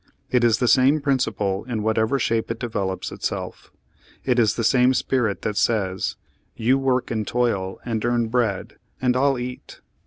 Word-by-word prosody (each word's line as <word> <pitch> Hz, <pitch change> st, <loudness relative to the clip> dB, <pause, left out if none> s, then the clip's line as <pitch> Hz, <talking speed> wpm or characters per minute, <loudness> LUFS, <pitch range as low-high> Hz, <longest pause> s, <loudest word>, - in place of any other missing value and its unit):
It 125 Hz, -1 st, +3 dB
is 115 Hz, -2 st, +4 dB
the 125 Hz, -, 0 dB
same 135 Hz, +5 st, +5 dB
principle 125 Hz, -8 st, 0 dB
in 115 Hz, -4 st, -3 dB
whatever 110 Hz, +4 st, +1 dB
shape 115 Hz, -3 st, 0 dB
it 115 Hz, 0 st, -4 dB
develops 100 Hz, -5 st, -3 dB
itself. -, -, -5 dB, 0.5 s
It 125 Hz, -2 st, +2 dB
is 110 Hz, -3 st, +3 dB
the 115 Hz, -, -2 dB
same 125 Hz, +2 st, +4 dB
spirit 120 Hz, -8 st, 0 dB
that 105 Hz, -1 st, -2 dB
says, 95 Hz, -5 st, 0 dB, 0.4 s
'You 125 Hz, +4 st, +2 dB
work 130 Hz, -2 st, 0 dB
and 110 Hz, -2 st, -2 dB
toil 125 Hz, +1 st, +1 dB
Page 120 Hz, -, +3 dB
Thirty 95 Hz, -1 st, -4 dB
six -, -, -17 dB
and 110 Hz, 0 st, -1 dB
earn 120 Hz, -1 st, +1 dB
bread, 110 Hz, -5 st, -1 dB, 0.2 s
and 125 Hz, -1 st, +1 dB
I'll 135 Hz, +1 st, +2 dB
eat 125 Hz, +1 st, -5 dB, 0.2 s
it.' -, -, -30 dB
120 Hz, 190 wpm, -23 LUFS, 110-125 Hz, 0.5 s, same